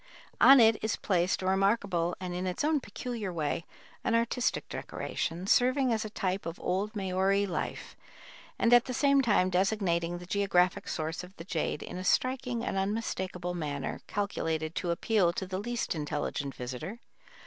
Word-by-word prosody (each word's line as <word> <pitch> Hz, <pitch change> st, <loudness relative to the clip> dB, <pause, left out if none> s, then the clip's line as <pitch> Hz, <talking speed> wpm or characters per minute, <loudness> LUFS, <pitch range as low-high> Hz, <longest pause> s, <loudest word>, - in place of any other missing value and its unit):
On 275 Hz, 0 st, +9 dB
it 225 Hz, -1 st, +5 dB
is 220 Hz, -, +1 dB
placed 185 Hz, -1 st, 0 dB
a -, -, -2 dB
remarkable 190 Hz, -3 st, +1 dB
and, 180 Hz, -1 st, -4 dB
in 180 Hz, +1 st, -2 dB
its 180 Hz, +9 st, -2 dB
own 305 Hz, 0 st, +3 dB
peculiar 225 Hz, -3 st, -5 dB
way, 165 Hz, 0 st, -2 dB, 0.4 s
an 230 Hz, -, +1 dB
artistic 235 Hz, +1 st, 0 dB
decoration, 170 Hz, +3 st, -4 dB
serving 255 Hz, +4 st, +3 dB
as 220 Hz, -, 0 dB
a 215 Hz, -, -5 dB
type 190 Hz, -3 st, -2 dB
of 165 Hz, -, -6 dB
old 200 Hz, +5 st, -1 dB
Maori 195 Hz, +1 st, +1 dB
life, 180 Hz, -3 st, -4 dB, 0.6 s
and 235 Hz, -, +3 dB
at 240 Hz, 0 st, +7 dB
the 255 Hz, -, -4 dB
same 280 Hz, 0 st, +4 dB
time 205 Hz, -6 st, +3 dB
designating 180 Hz, -3 st, +1 dB
the 175 Hz, -, -9 dB
geographic 185 Hz, -2 st, +1 dB
source 160 Hz, +3 st, -3 dB
of 180 Hz, +2 st, -12 dB
the 165 Hz, -, -7 dB
jade 165 Hz, -4 st, -2 dB
in 180 Hz, -, -6 dB
a -, -, -5 dB
striking 250 Hz, +3 st, 0 dB
and -, -, -2 dB
unmistakable 190 Hz, -3 st, -2 dB
manner 145 Hz, -5 st, -4 dB
calculated 165 Hz, -6 st, -2 dB
to 175 Hz, -, -2 dB
appeal 180 Hz, +1 st, +2 dB
to 190 Hz, -, -3 dB
the 185 Hz, 0 st, -4 dB
least 240 Hz, +3 st, -2 dB
intelligent 145 Hz, -2 st, -3 dB
visitor. 130 Hz, -, -6 dB
190 Hz, 170 wpm, -30 LUFS, 175-225 Hz, 0.6 s, On